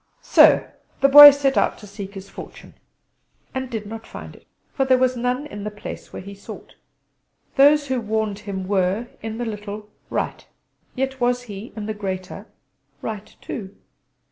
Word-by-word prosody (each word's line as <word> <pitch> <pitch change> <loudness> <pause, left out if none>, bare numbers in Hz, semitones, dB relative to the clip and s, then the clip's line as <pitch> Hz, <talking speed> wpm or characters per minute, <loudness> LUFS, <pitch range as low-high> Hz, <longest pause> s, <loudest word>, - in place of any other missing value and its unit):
So - - +6 0.3
the 275 - +5
Boy 290 +1 +13
set 275 -2 +1
out - - 0
to 210 - -12
seek 200 0 -9
his 195 0 -8
fortune, - - -11 0.8
and 260 -1 -4
did 220 -4 -5
not 225 +2 -8
find - - -10
it; - - -20 0.3
for 270 - +1
there 260 -1 +4
was 255 0 +2
none 250 +3 -1
in 205 -9 -8
the 210 - -3
place 210 0 -9
where - - -8
he 200 +1 -9
sought. 200 - -11 0.8
Those 290 +1 +5
who 260 -3 -1
warned 215 -2 -2
him 195 -3 -6
were 195 +4 0
in 220 0 -5
the 240 - -3
little 210 -1 -7 0.2
right: - - -3 0.5
yet 265 0 -2
was 245 0 +1
he 210 -1 -9
in 215 -2 -5
the 215 - -3
greater 190 -3 -6 0.6
right 215 -1 -6
too! 195 -2 -7
220 Hz, 170 wpm, -22 LUFS, 205-255 Hz, 0.8 s, Boy